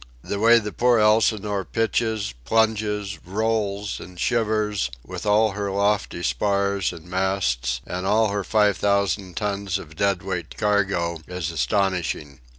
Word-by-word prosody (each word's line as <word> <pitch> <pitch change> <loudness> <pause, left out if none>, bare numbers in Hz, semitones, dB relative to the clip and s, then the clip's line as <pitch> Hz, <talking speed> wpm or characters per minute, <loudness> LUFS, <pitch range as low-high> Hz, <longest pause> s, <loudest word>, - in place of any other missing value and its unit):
The 100 - -3
way 115 +2 +6
the 105 -2 -2
poor 120 +2 +3
Elsinore 105 -2 +2
pitches, 110 - -1
plunges, 105 - 0
rolls, 105 0 -1
and 90 -1 -11
shivers, 110 - 0 0.2
with - - -6
all 105 +1 +4
her 100 0 -3
lofty 100 -2 0
spars 100 -2 0
and 85 -2 -11
masts 90 -11 -1
and 90 +1 -4
all 110 +1 +3
her 100 0 -2
five 105 -1 +2
thousand 100 -3 0
tons 100 -2 -1
of 80 -4 -11
dead 100 0 +1
weight 90 -4 -5
cargo, 95 -5 0
is 90 -2 -4
astonishing. 80 -2 -1
100 Hz, 140 wpm, -23 LUFS, 90-105 Hz, 0.2 s, way